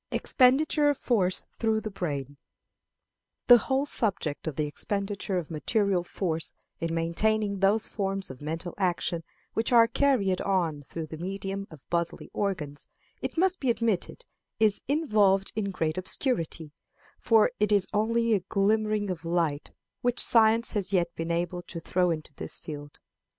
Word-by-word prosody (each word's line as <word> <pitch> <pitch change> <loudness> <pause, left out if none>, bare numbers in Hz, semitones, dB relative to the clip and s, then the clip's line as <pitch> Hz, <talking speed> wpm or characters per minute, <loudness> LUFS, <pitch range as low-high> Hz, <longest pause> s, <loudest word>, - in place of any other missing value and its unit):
Expenditure 290 +3 +3
of 290 - +1
Force 190 -7 +1 0.2
through 220 -1 +2
the 215 -1 -6
Brain. 145 -7 -4 1.1
The 245 -1 +9
whole 265 +5 0
subject 195 - 0
of 155 - -3
the 150 - 0
expenditure 200 +5 -1
of 170 -2 -4
material 190 +3 +1
force 165 -3 -3 0.3
in 165 -1 -2
maintaining 200 +5 0
those 200 +3 +2
forms 195 -4 -2
of 130 - -12
mental 165 +4 -4
action 175 -2 0 0.3
which 225 +2 -1
are 235 -2 +7
carried 230 -6 +1
on 170 -7 0
through 160 +3 -6
the 155 0 -9
medium 195 +2 -4
of 155 -5 -15
bodily 170 -1 -2
organs, 155 -8 -3 0.3
it - - -4
must 370 +1 +2
be 265 - 0
admitted, 230 - -1 0.3
is 215 -2 +3
involved 210 -10 +2
in 210 -2 -1
great 160 -3 -1
obscurity; 170 - -2 0.5
for 225 +1 +4
it 210 0 +2
is 200 -2 +3
only 230 +2 +2
a 205 - +3
glimmering 210 +1 +1
of 170 -3 -6
light 165 -3 -1 0.3
which 245 0 0
science 230 -1 +4
has 200 -3 -2
yet 170 -3 +1
been 165 0 -4
able 175 +1 -1
to 175 -1 -8
throw 180 +2 +1
into 155 -2 -4
this - - -3
field. 145 -2 -9
195 Hz, 155 wpm, -28 LUFS, 165-220 Hz, 1.1 s, The